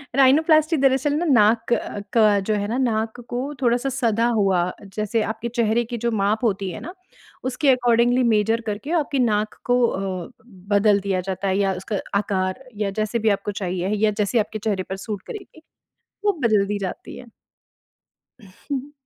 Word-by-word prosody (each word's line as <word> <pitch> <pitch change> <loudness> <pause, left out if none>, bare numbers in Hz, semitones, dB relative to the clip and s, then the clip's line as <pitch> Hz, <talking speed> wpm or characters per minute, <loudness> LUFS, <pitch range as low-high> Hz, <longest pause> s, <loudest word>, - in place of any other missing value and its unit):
Rhinoplasty 310 +4 +4
दरअसल 270 +1 +2
ना, 320 +4 0
नाक 225 -5 +4
क 205 -3 -1
का 215 -3 +4
जो 200 +2 -1
है 205 0 -1
ना, 230 +4 -2
नाक 225 -3 -1
को 255 +4 -3
थोड़ा-सा 245 +2 +1
सदा 235 -3 +1
हुआ, 180 -3 +2 0.2
जैसे 215 +1 0
आपके 220 +2 -4
चेहरे 230 0 +2
की 240 +1 -5
जो 235 - +2
माप 215 +1 0
होती 195 -4 0
है - - -7
ना 350 - -8 0.5
उसके 260 +3 0
अकॉर्डिंगली 245 0 +3
मेजर 225 +2 +1
करके 215 +9 -4
आपकी 280 -2 -2
नाक 215 -3 +1
को 245 0 +2
अ, 190 -4 -4 0.4
बदल 205 0 +4
दिया 195 -2 -1
जाता 190 +1 -2
है 190 0 +1
या 195 -1 +1
उसका 200 0 -3 0.2
आकार 195 +2 -2 0.2
या 200 - 0
जैसे 215 +2 -1
भी 220 0 +2
आपको 200 +1 -5
चाहिए 185 0 -2 0.2
या 215 - +3
जैसे 210 +4 +1
आपके 215 0 -2
चेहरे 200 -3 -1
पर 190 - -3
सूट 210 -3 -4
करेगी, 380 -6 -9 0.6
वो 410 - +5
बदल 215 -4 +3
दी 205 +1 -1
जाती - - -8
है। 245 - -12 1.1
हुँ। 265 +9 -7
220 Hz, 175 wpm, -22 LUFS, 200-250 Hz, 1.1 s, वो